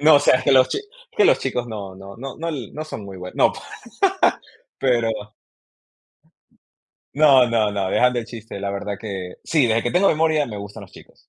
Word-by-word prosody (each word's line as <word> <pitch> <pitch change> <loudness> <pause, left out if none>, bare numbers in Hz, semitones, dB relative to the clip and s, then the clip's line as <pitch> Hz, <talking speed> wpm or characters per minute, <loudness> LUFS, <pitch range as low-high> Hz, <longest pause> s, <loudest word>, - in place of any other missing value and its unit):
No, 155 +1 +7
o 145 - +4
sea, 130 -3 +4
que 135 - +3
los 130 -1 +6
chi - - -2 0.4
que 420 - +5
los - - +5
chicos 125 -2 -2
no 100 -4 -7
no 100 +1 -11
no 135 +7 -6
l 135 -9 -5
no 155 +1 -5
son 110 -9 -8
muy 95 -1 -9
bue 90 0 -8
no, - - +3
pa - - -11 1.2
Pero 120 -3 +2 2.1
No, 140 -4 +6
no, 115 -3 +1
no, 100 -2 -2
dejando 125 0 +3
el - - -7
chiste, 115 -2 -9
la 100 0 -3
verdad 100 +1 -4
que 95 -4 -6
Sí, 155 -6 +2
desde 115 0 +1
que 120 - -1
tengo 185 +3 +3
memoria 155 -1 +2
me 105 -3 -7
gustan 100 +1 -8
los 95 - -14
chicos. - - -18
120 Hz, 200 wpm, -21 LUFS, 100-140 Hz, 2.1 s, No